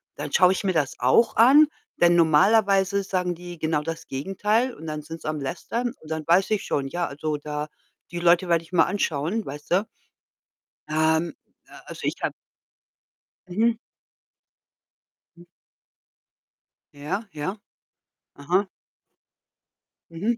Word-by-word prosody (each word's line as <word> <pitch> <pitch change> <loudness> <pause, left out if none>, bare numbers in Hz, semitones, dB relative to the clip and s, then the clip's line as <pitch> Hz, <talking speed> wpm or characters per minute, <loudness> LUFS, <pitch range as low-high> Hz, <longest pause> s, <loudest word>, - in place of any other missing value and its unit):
dann - - -6
schaue 185 0 +5
ich 190 - -4
mir 190 -2 +1
das 145 -4 0
auch 130 - +3
an, 280 +6 +7 0.3
denn 175 0 +5
normalerweise 195 +4 +4
sagen 180 -2 -1
die 175 -1 -10
genau 155 -1 0
das 165 +1 -6
Gegenteil 210 - 0
und 160 - -10
dann 150 -1 -4
sind 165 +2 -9
sie - - -8
am 155 -1 -2
lästern 230 - -3
und 155 - -13
dann 160 -1 -3
weiß 180 +4 +3
ich 215 -3 0
schon, 135 -1 -1
ja, 175 +4 -2
also, 150 +1 -3
da 150 0 -5 0.4
die 175 - -5
Leute 175 +1 +3
werde 165 -1 +2
ich 165 - -20
mal 170 -2 +4
anschauen, 190 +2 -1
weißte. 150 +8 -1 1.0
Ähm, 160 +2 +1 0.3
äh, - - -18
also, - - -9
ich - - -1
habe - - -1 1.2
Mhm. 225 +5 +1 1.6
Mhm. 175 - -15 1.5
Ja, 180 +10 -4
ja. 155 +7 -4 0.8
Aha. 180 +7 0 1.4
Mhm. 210 +8 -1
175 Hz, 135 wpm, -24 LUFS, 155-195 Hz, 1.6 s, an